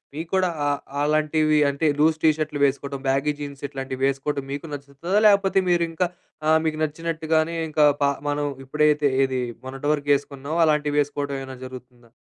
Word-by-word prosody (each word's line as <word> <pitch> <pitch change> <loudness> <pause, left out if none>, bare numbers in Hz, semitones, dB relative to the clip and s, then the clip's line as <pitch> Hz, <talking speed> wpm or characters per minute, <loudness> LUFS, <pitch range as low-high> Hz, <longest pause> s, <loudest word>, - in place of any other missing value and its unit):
మీకు 160 +2 -5
కూడా 185 -1 +2 0.2
ఆహ్, 145 -1 0 0.2
ఆహ్, - - +1
అలాంటివి 155 0 +2
అంటే 140 +3 0
లూజ్ 155 +1 +4
టీషర్ట్‌లు 155 -2 +1
వేసుకోవడం 140 0 -2
బ్యాగీ 140 +2 +1
జీన్స్ 140 -1 -7
ఇట్లాంటివి 135 -1 -5
వేసుకోవడం 140 0 -2
మీకు 140 +3 -5
నచ్చుతుందా? 145 +8 -2
లేకపోతే 195 -2 +4
మీరు 175 -1 +3
ఇంకా 175 +2 0 0.4
ఆహ్, 160 0 +5
మీకు 155 -1 -1
నచ్చినట్టుగానే 160 +1 -1
ఇంకా 150 -1 +4 0.2
ప - - +4 0.3
మనం 145 0 -1 0.2
ఇప్పుడైతే, 150 +1 +2 0.2
ఏది 130 -1 -2 0.2
మొన్నటి 135 +2 -4
వరకు 145 -1 -4
వేసుకున్నామో, 140 +3 -5
అలాంటివి 150 -1 +1
వేసుకోవడం 140 -1 -3
ఏమైనా 130 -1 -9
జరుగుతుందా? 125 -2 -12
145 Hz, 160 wpm, -23 LUFS, 140-155 Hz, 0.4 s, ఆహ్